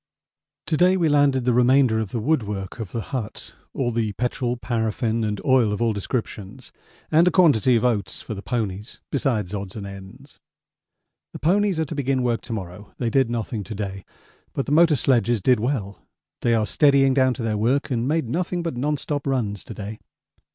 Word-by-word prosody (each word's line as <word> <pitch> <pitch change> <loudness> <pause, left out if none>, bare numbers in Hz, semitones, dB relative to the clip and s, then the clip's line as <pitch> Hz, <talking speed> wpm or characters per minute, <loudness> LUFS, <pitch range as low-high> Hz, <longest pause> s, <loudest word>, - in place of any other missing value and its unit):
To 155 - 0
day 185 +3 +4
we 165 -3 +2
landed 140 -3 +3
the 125 - +3
remainder 125 -1 +4
of 110 -3 -3
the 115 - -3
woodwork 105 - -2
of 105 -5 -5
the 115 - -3
hut, 115 -5 -5 0.2
all 120 -3 -1
the 110 -2 -1
petrol, 125 +2 -2
paraffin 115 -1 -1
and 105 -2 -2
oil 130 -5 +4
of 105 - -2
all 115 -1 +1
descriptions, 105 -1 -5 0.4
and 165 +3 +5
a - - +7
quantity 145 - +4
of 115 - +1
oats 105 -6 -1
for 110 - -6
the 100 - -7
ponies 105 -3 -4
besides 115 -9 -1
odds 100 -2 -5
and 105 -2 -6
ends. 100 +8 -12 0.9
The - - -7
ponies 190 +4 +2
are 160 - +1
to 150 - -6
begin 135 -3 0
work 120 -2 0
to 120 - -9
morrow; 95 -1 -8
they 120 -3 -1
did 135 -2 +2
nothing 115 -2 -3
to 110 - -7
day, 95 -2 -5 0.5
but 135 - -2
the - - -4
motor 165 0 +5
sledges 120 -2 +2
did 125 +4 +3
well 110 -5 -2 0.4
they 120 -1 +2
are 110 -1 +1
steadying 135 +4 +4
down 130 -2 +3
to 115 - -5
their 110 -1 0
work 130 +7 0
and 120 0 0
made 155 -3 0
nothing 175 +6 -2
but 165 -6 -3
non 145 +4 0
stop 145 0 -3
runs 105 -8 -1
to 110 - -9
day. 105 +1 -7
120 Hz, 200 wpm, -23 LUFS, 105-135 Hz, 0.9 s, a